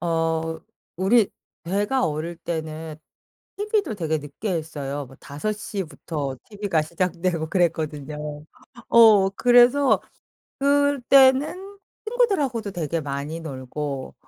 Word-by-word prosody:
어 165 -1 -1 0.4
우리 200 +4 +3 0.3
제가 205 +9 0
어릴 160 +3 -4
때는 160 -1 -5 0.6
티비도 415 - 0
되게 160 -5 -1
늦게 150 +8 -5
했어요. 145 -4 -4
뭐 135 +1 -16
5:00 205 +6 -4
부터 145 -3 -5
티비가 200 -6 -1
시작되고 170 0 -1
그랬거든요. 150 -4 -2 0.4
어 215 -4 +7
그래서 245 +6 +5 0.6
그때는 285 +6 +3 0.3
친구들하고도 300 - 0
되게 165 -2 -2
많이 145 +3 -4
놀고 135 -2 -5
170 Hz, 225 characters per minute, -24 LUFS, 155-235 Hz, 0.6 s, 어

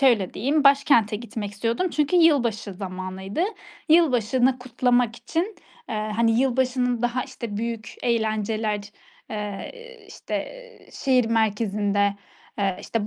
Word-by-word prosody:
şöyle 235 -9 +3
diyeyim, 285 +4 +1
başkente 255 -6 +5
gitmek 220 -2 -6
istiyordum 235 - -1
çünkü 300 +4 +1
yılbaşı 240 - +3
zamanıydı. 190 - -4 0.5
Yılbaşını 255 -5 +3
kutlamak 245 -1 +1
için, 355 - -3 0.3
eee, - - -2 0.2
hani, 230 +1 +3
yılbaşının 255 -2 +1
daha, 240 +1 0
işte, 225 -4 -7
büyük 230 0 -4
eğlenceler, 220 -2 0 0.5
eee, 210 -2 -5 0.4
işte, - - -5
eee, - - -9
şehir 255 -3 +2
merkezinde, 205 -2 +1 0.4
eee, 195 -2 0
işte, 225 -2 -2
235 Hz, 115 wpm, -24 LUFS, 210-260 Hz, 0.5 s, başkente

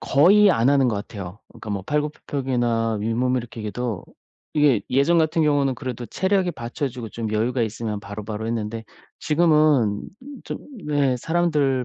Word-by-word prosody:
거의 195 +9 +5
안 120 -4 +2
하는 140 -2 +4
것 115 - 0
같아요. 100 -2 -7
그러니까 110 - -10
뭐 100 -1 -2
팔굽혀펴기나 125 -5 -1
윗몸일으키기도 115 -1 -2 0.5
이게 145 -7 +4
예전 140 +6 +3
같은 160 0 +2
경우는 145 -3 +2
그래도 125 -1 -6
체력이 190 - 0
받쳐 120 +3 -4
주고 120 -3 -7
좀 115 -2 -4
여유가 120 +4 0
있으면 110 -1 -3
바로바로 105 +2 -6
했는데 115 0 -3 0.3
지금은 150 -9 +2 0.4
좀 - - -5 0.3
네 145 -4 +2
사람들 150 -4 +1
125 Hz, 345 characters per minute, -23 LUFS, 115-150 Hz, 0.5 s, 거의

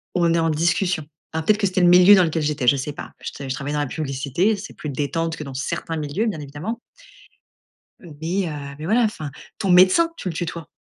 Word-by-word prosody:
on 170 -2 +3
est 170 - +2
en 165 0 +1
discussion.» 175 +1 0 0.3
alors 160 0 -3
peut-être 215 0 +3
que 200 - +2
c'était 185 0 0
le 175 - +5
milieu 180 +3 +8
dans 185 - +5
lequel 160 -1 -1
j'étais, 150 -4 -1
je 140 - +6
sais 140 +2 -3
pas. 145 - -9
Je - - -5
te 140 - -8
je 130 - -2
travaillais 145 +2 -4
dans - - 0
la 145 - 0
publicité, 145 - -1
c'est 200 - -9
plus 150 - -7
détente 160 +4 -2
que 155 - -6
dans 135 -2 -8
certains 145 +4 -3
milieux, 155 +8 -2
bien 200 -9 -2
évidemment 150 - -6 1.2
mais 170 +3 -3
heu, 140 -2 -7
mais 155 - -7
voilà, 225 +7 +3
enfin. 155 -10 -2 0.3
Ton 195 -4 -1
médecin, 185 - +6
tu 185 - -5
le 165 - -4
tutoies. 170 -1 -5
165 Hz, 235 wpm, -22 LUFS, 145-185 Hz, 1.2 s, milieu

